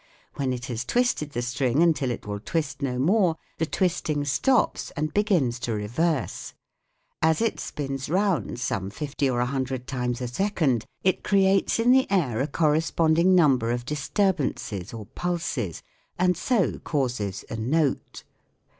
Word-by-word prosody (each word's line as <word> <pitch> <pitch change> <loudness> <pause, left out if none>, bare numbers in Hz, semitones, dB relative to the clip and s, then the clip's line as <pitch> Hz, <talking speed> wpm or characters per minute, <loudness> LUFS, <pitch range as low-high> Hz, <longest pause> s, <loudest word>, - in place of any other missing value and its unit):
When 135 -2 -1
it 125 -1 -4
has 120 -1 -3
twisted 240 - 0
the 120 - -2
string 125 +4 +1
until 155 -6 +2
it 120 - -4
will 105 0 -4
twist 140 +3 -3
no 130 -3 -1
more, 175 - +3 0.2
the 160 - 0
twisting 160 -5 0
stops 240 - +1
and 155 +1 -1
begins 170 - +1
to 120 - -2
reverse. 125 +8 -2 0.3
~] - - -48 0.3
As 160 0 +3
it 230 -1 0
spins 135 -2 -4
round 175 - 0
some 95 -5 -2
fifty 140 +4 -2
or 120 -1 0
a - - +2
hun 135 +1 -1
dred 130 -1 -5
times 125 -2 -2
a 125 - -3
second, 140 - 0 0.2
it 185 - +1
creates 195 -1 +3
in 230 +2 +4
the 260 0 +4
air 135 - +1
a 140 - 0
corres 155 0 +1
ponding 170 +3 +4
num 145 -7 +5
ber 115 0 -2
of 120 0 -2
disturb 165 +7 0
ances 100 -9 -3
or 110 -3 -7
pulses 165 - -3 0.3
and 180 0 +3
so 230 -4 0
causes 120 - -2
a - - -2
"note." 135 +6 -1
145 Hz, 170 wpm, -25 LUFS, 125-175 Hz, 0.3 s, num